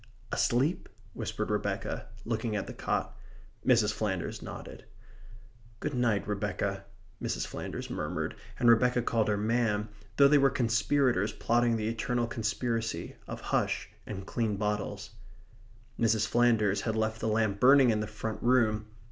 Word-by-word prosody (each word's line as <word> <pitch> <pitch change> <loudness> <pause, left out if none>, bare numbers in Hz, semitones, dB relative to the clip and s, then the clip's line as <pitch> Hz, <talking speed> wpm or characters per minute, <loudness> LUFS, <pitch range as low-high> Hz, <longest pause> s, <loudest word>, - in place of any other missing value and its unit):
"Asleep?" 135 +8 +1 0.2
whispered - - -3
Rebecca, - - -2 0.2
looking 115 -1 -1
at 100 - -1
the - - -7
cot. - - -2 0.5
Mrs. 115 -4 +4
Flanders 95 -5 -2
nodded. - - -8 1.0
"Good 150 +2 -3
night, 120 -6 +1
Rebecca," 100 -1 -2 0.4
Mrs. - - -2
Flanders - - -5
murmured, - - -3 0.2
and 120 - +3
Rebecca 125 +1 +5
called 115 -2 +1
her 105 -1 +1
ma'm, 110 -1 0 0.3
though 140 - +8
they 145 +1 +5
were 135 0 +5
conspirators 120 -3 +2
plotting 120 0 +2
the 110 -1 -2
eternal 120 +1 -1
conspiracy 115 -4 -2
of - - -6
hush - - -1 0.2
and 95 -2 -6
clean 110 -2 -1
bottles. 105 0 -2 0.9
Mrs. 110 -2 +3
Flanders 110 -4 +3
had 110 -2 -1
left 110 0 -1
the - - -1
lamp 110 -2 +1
burning 130 +1 +7
in 110 - +1
the 105 - -2
front 110 +1 -5
room. 110 -4 +2
110 Hz, 140 wpm, -30 LUFS, 105-120 Hz, 1.0 s, though